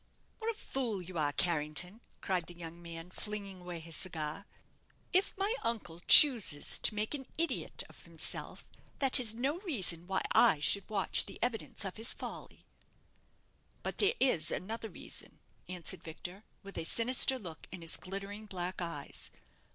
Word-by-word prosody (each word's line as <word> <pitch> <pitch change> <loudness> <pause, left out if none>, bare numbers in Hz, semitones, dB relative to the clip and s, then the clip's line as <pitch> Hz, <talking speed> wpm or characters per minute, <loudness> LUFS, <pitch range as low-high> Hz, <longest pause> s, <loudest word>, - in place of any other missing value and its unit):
"What 450 0 -2
a 455 - -2
fool 245 - -1
you 175 -1 -5
are, 145 -1 +1
Carrington!" 170 - 0 0.2
cried 180 -3 -1
the 175 - -9
young 170 0 -8
man, 170 +1 -8
flinging 200 -3 -3
away 175 -1 -6
his 165 0 -2
cigar. 160 +1 -2 0.7
"If 380 +2 +2
my 395 +3 +1
uncle 175 -8 -2
chooses 230 - +7
to - - -1
make 210 +4 -1
an 270 -3 -5
idiot 335 +1 +2
of - - -16
himself, - - -2 0.3
that 270 -2 +4
is 225 -3 +3
no 275 +8 -1
reason 190 - -1
why 190 - 0
I 155 - +6
should 200 +8 +3
watch 200 -3 +2
the - - -9
evidence 230 -4 -2
of 190 - -5
his 225 +1 0
folly!" - - -8 1.2
"But - - -4
there 415 +3 +3
is 170 - +3
another 225 +3 -3
reason," - - -6 0.3
answered 180 -3 -2
Victor, 175 +5 -8 0.2
with 195 0 -6
a - - -2
sinister 250 +7 +4
look 175 -9 -9
in 175 - -7
his 165 - -1
glittering 200 +3 -6
black 185 -1 -4
eyes. 165 -5 -5
195 Hz, 160 wpm, -33 LUFS, 170-230 Hz, 1.2 s, chooses